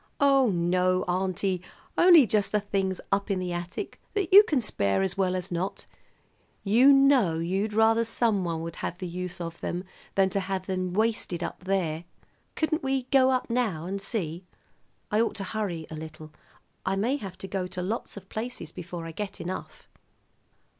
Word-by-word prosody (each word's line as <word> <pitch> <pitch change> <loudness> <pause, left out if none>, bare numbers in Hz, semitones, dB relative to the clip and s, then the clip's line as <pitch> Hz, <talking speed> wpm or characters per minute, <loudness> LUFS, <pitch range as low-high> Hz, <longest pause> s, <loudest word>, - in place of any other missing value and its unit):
"Oh, 275 -3 +5
no, 180 0 +2
auntie, 185 0 -1 0.3
only 345 -6 +8
just 210 -1 +1
the 210 - +2
things 195 -2 -1
up 200 +1 +1
in 195 - +1
the 180 -1 -3
attic 175 +1 -5
that 390 -3 -1
you 405 - +12
can 305 -10 0
spare 100 - +1
as 95 - -1
well 185 -1 +1
as 180 0 -3
not. 175 +3 -3 0.8
You 235 +7 +6
know 275 -11 +5
you'd 190 +6 -1
rather 225 +1 +4
someone 200 -8 0
would 165 0 -6
have 175 - -4
the 185 -1 -5
use 180 +1 -5
of 170 -1 -6
them 175 +1 -3 0.3
than 190 -1 +3
to 195 - +1
have 190 -1 -3
them 185 -1 -2
wasted 215 -5 0
up 180 - -6
there. 175 -4 -1 0.5
Couldn't 315 0 0
we 270 -1 0
go 265 -1 +5
up 255 -1 +1
now 215 -10 0
and 195 +2 -4
see? 180 -5 -3 0.7
I 210 +1 +3
ought 230 - 0
to 200 - -4
hurry 190 -5 -3
a - - -5
little. 155 0 -9 0.5
I 190 - 0
may 235 +8 +1
have 190 -8 -8
to 195 - -7
go 190 -2 -2
to 180 0 -4
lots 210 +2 -3
of 200 - -10
places 220 -8 -5
before 175 -1 -7
I 165 - -6
get 200 +3 -6
enough." 185 +2 -6
190 Hz, 180 wpm, -27 LUFS, 175-220 Hz, 0.8 s, you